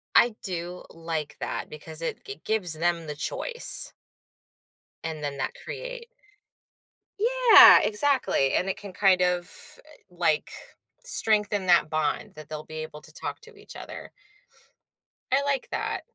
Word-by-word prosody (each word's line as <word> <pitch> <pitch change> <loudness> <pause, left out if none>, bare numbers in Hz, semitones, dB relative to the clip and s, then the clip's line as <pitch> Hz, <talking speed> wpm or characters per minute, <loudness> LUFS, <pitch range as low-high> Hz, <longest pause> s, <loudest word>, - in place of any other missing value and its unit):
I 235 -2 +4
do 180 -1 -5
like 165 -2 -6
that, - - -6
because 155 +1 -1
it 165 - -5
g 135 +3 -9
gives 210 -6 +3
them 165 0 +1
the 150 - -6
choice 485 - +5 1.1
and 160 -2 -6
then 140 -1 -5
that 130 -1 -3
create - - -8 1.1
Yeah! 465 -4 +7
Exactly, 220 - +1
and 190 - -1
it 190 - -4
can 200 -2 -11
kind 185 -1 +2
of, 180 -1 -1 0.4
uh, 300 -12 -22
like, 160 -3 -1 0.5
strengthen 210 - +1
that 175 -3 +3
bond 155 -1 -3
that 155 0 -13
they'll 155 0 -7
be 155 - -12
able 155 -1 -8
to - - -11
talk - - -6
to 455 +1 -17
each 415 +1 -14
other. - - -10 1.2
I 275 +2 +1
like 275 -2 -2
that. - - -4
180 Hz, 145 wpm, -25 LUFS, 155-265 Hz, 1.2 s, Yeah